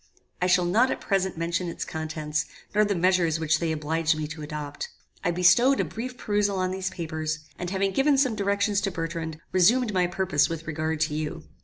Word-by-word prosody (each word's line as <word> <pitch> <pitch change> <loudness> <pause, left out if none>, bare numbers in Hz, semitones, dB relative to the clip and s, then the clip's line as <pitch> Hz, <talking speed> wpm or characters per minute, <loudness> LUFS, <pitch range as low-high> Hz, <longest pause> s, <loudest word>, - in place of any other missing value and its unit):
I 180 - +3
shall 180 -1 +4
not 225 +9 +3
at - - -2
present 190 -3 0
mention 170 +2 -1
its - - -5
contents, 155 -1 -3 0.3
nor 210 0 +4
the 205 -1 0
measures 175 -2 +2
which 155 -1 +2
they 165 -2 0
obliged 160 +1 0
me 155 - -2
to 155 0 -7
adopt. 150 -1 -5 0.3
I - - +2
bestowed 185 +10 +5
a 195 - +2
brief 230 +10 -6
perusal 205 -3 0
on 185 0 0
these 190 0 -2
papers, 155 -2 -3 0.2
and 180 - -3
having 195 +1 0
given 275 +7 +3
some 265 -3 +3
directions 200 0 +1
to 195 -1 -1
Bertrand, 165 -2 -4
resumed 215 +5 +4
my 180 -1 +2
purpose 175 -5 +1
with 165 0 -5
regard 155 0 -2
to 155 -1 +1
you. 155 +2 -3
175 Hz, 200 wpm, -26 LUFS, 160-195 Hz, 0.3 s, bestowed